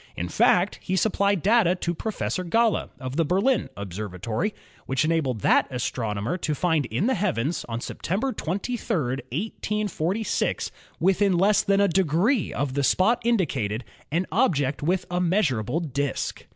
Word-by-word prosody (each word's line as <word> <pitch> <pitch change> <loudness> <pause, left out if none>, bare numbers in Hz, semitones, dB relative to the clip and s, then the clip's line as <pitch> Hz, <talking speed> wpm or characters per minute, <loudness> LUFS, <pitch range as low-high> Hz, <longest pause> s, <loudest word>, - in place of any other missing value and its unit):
In 85 +1 -3
fact, 180 - +3
he 185 - -2
supplied 200 -2 +1
data 205 -4 +4
to 175 -1 -2
Professor 195 0 -3
Galle, 225 +5 +1
of 130 +1 -5
the 165 - +4
Berlin 195 - +1
Observatory, 100 - -3 0.4
which 130 +3 +1
enabled 150 -9 0
that - - +4
astronomer 115 - -2
to 155 -4 -2
find 160 -4 +1
in 120 - -1
the 260 - +2
heavens 170 - -1
on 115 0 -3
September 220 - -2
23, 205 +8 -2
1846, 175 - -2 0.3
within 190 0 +3
less 200 +3 +4
than 195 0 +2
a 200 - +5
degree 190 - +2
of 140 -2 -2
the 140 +1 0
spot 220 - +3
indicated 135 - 0 0.3
an 170 +4 +1
object 150 - +1
with 180 +4 0
a 180 - 0
measurable 165 - +1
disk. 140 -4 -3
170 Hz, 145 wpm, -25 LUFS, 130-200 Hz, 0.4 s, a